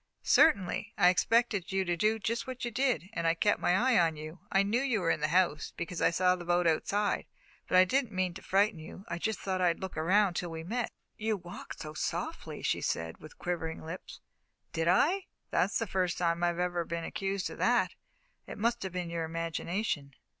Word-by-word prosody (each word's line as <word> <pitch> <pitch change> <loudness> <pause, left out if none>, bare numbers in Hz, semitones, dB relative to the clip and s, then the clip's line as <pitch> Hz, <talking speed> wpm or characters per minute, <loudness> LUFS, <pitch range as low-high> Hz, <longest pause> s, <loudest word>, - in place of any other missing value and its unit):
"Certainly. 220 - +3
I 180 -3 +6
expected 210 0 +2
you 190 0 +1
to 175 -1 0
do 215 +6 +2
just 230 +3 -2
what 255 -1 -4
you 240 - -3
did, 225 - 0
and 170 0 -1
I 165 - +3
kept 205 +5 +2
my 180 - +2
eye 250 0 +4
on 165 -2 +3
you. 155 +3 -8
I 195 0 +4
knew 220 +5 +1
you 255 -6 +1
were 165 -3 +1
in - - 0
the 150 - +1
house, 170 -2 +1
because 170 0 -4
I - - +5
saw 180 +1 +3
the 175 - -8
boat 175 0 +2
outside, 200 +5 +1 0.4
but 185 - +3
I 185 - +8
didn't 260 +3 0
mean 185 -2 0
to 190 - -9
frighten 200 -1 +2
you. 165 +5 -10
I 170 - -3
just 220 +4 -1
thought 190 -1 -2
I'd 175 -2 +2
look 190 -1 -6
around 190 +6 +3
until 175 0 -3
we 160 0 -6
met." 230 +7 -2 0.3
"You 215 - -5
you 220 -2 +2
walked 175 -2 -9
so 155 -1 -6
softly," - - -4
she - - 0
said, 80 0 -2
with 155 - -13
quivering 165 -2 -3
lips. 165 +3 -8 0.5
"Did 165 0 0
I? 340 - +3 0.3
That's - - +2
the - - -1
first 185 -2 0
time 170 -1 0
I've 175 -1 +1
ever 175 -1 0
been 170 0 -4
accused 195 +3 -2
of - - -10
that. - - +3 0.5
It - - -7
must 235 +3 0
have 190 -2 -4
been 175 -2 -3
your 165 -1 -2
imagination." 165 - -3
180 Hz, 220 wpm, -31 LUFS, 170-210 Hz, 0.5 s, I